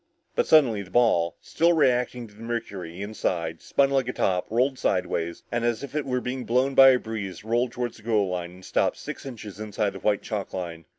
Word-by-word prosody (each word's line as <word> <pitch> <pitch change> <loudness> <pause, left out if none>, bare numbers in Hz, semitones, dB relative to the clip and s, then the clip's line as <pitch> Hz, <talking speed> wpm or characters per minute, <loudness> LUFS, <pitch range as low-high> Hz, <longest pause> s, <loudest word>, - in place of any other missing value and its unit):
But - - +1
suddenly 125 -10 +5
the 95 - -10
ball, 95 -8 +3
still 170 +1 +2
reacting 125 -5 +1
to 105 - -16
the 105 - -15
mercury 100 -6 -5
inside, 85 -6 -2
spun 140 0 +2
like 135 -3 +1
a 125 - -2
top, 90 -2 0
rolled 130 +4 +1
sideways, 85 -2 -1
and 120 0 -1
as 120 +2 0
if 140 - -7
it 150 -2 -2
were 125 -1 0
being 125 +1 -4
blown 130 +4 +1
by 135 0 +9
a 130 - +5
breeze, 105 -6 -6
rolled 120 +2 0
toward 120 -1 -3
the - - -16
goal 105 -3 +1
line 90 -1 -3
and 90 +1 -14
stopped - - +1
six - - -7
inches 105 -6 -8
inside 105 -1 -1
the - - -9
white 105 -1 +1
chalk 105 -3 -4
line. 85 -3 -5
115 Hz, 220 wpm, -26 LUFS, 95-125 Hz, -, by